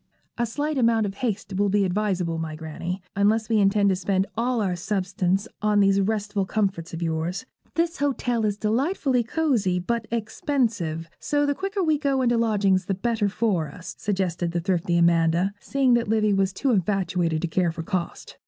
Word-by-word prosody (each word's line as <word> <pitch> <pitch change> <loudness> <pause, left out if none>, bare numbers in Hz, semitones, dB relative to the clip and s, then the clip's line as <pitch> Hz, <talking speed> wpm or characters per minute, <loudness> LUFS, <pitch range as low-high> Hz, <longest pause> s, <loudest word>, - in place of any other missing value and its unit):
'A 240 - +1
slight 290 +4 -2
amount 230 -2 +3
of 195 - -3
haste 205 -3 -3
will 205 0 +2
be 200 0 +2
advisable, 180 -4 -1
my 160 -1 -4
Granny, 165 +4 -5
unless 215 +3 +2
we 220 -2 +3
intend 200 0 +3
to 190 - +3
spend 190 +1 0
all 240 +2 0
our 190 -4 0
substance 195 +1 -1
on 210 -1 +3
these 195 0 +4
restful 205 0 -1
comforts 190 -4 -1
of 165 +1 -4
yours. 165 +6 -2 0.3
This 335 +2 0
hotel 250 -5 0
is 205 -1 0
delightfully 255 - +1
cosy, 230 - +1
but 225 +5 -2
expensive; 220 - -1
so 290 0 +1
the 285 - +1
quicker 390 +4 -2
we 310 -3 +2
go 275 -3 +1
into 240 -1 +3
lodgings 200 -5 +2
the 195 - -1
better 210 +1 0
for 195 -6 0
us,' 175 +5 -9
suggested 180 -4 -1
the 175 - 0
thrifty 175 0 0
Amanda, 170 +2 +3
seeing 270 0 +2
that 235 -1 +2
Livy 215 -1 +2
was 195 0 +2
too 265 +8 0
infatuated 180 -5 0
to - - +1
care 175 0 +1
for 165 0 -6
cost. 180 -1 -4
200 Hz, 180 wpm, -24 LUFS, 180-230 Hz, 0.3 s, these